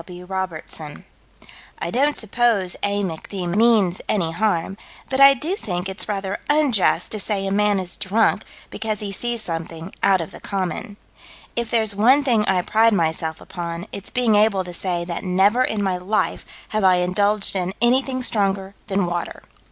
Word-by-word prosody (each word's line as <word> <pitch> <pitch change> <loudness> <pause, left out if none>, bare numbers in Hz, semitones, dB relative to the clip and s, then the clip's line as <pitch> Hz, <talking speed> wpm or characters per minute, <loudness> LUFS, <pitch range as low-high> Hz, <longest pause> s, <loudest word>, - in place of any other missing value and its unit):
W. 180 0 -10
Robertson": 170 -5 -5 0.7
"I 170 - -4
don't 285 +6 +1
suppose 220 -4 +1
A. 205 0 0
Mc. 165 -4 -5
D. 190 -3 -3
means 200 -1 +3
any 170 -6 +1
harm, 195 -1 0 0.4
but 265 - 0
I 275 0 +8
do 320 +9 -1
think 180 - -4
it's 190 +2 -4
rather 195 -1 -3
unjust 290 -9 +2
to 215 - 0
say 200 -1 -2
a 195 - -2
man 205 0 +2
is 185 -1 -5
drunk 215 +4 +1 0.3
because 215 -2 -2
he 205 -1 -3
sees 235 +3 -2
something 165 0 -6
out 195 -1 +4
of 165 - -5
the - - -11
common. 200 +2 -4 0.6
If 235 -1 -2
there's 220 -3 +1
one 255 +8 +5
thing 235 -6 +2
I 185 -2 +2
pride 225 +3 +3
myself 160 -3 -1
upon, 170 -1 -6
it's 200 - -7
being 245 -3 +1
able 205 -2 +3
to 180 -1 -8
say 175 -1 -2
that 170 -1 -4
never 195 +6 +3
in 215 -5 -1
my 190 -2 0
life 185 +4 -1 0.2
have 215 -1 -1
I 185 -1 +6
indulged 200 +4 +1
in 185 -1 -1
anything 255 +2 +2
stronger 195 -3 0
than 195 -2 0
water." 175 0 -4
195 Hz, 175 wpm, -22 LUFS, 180-220 Hz, 0.7 s, I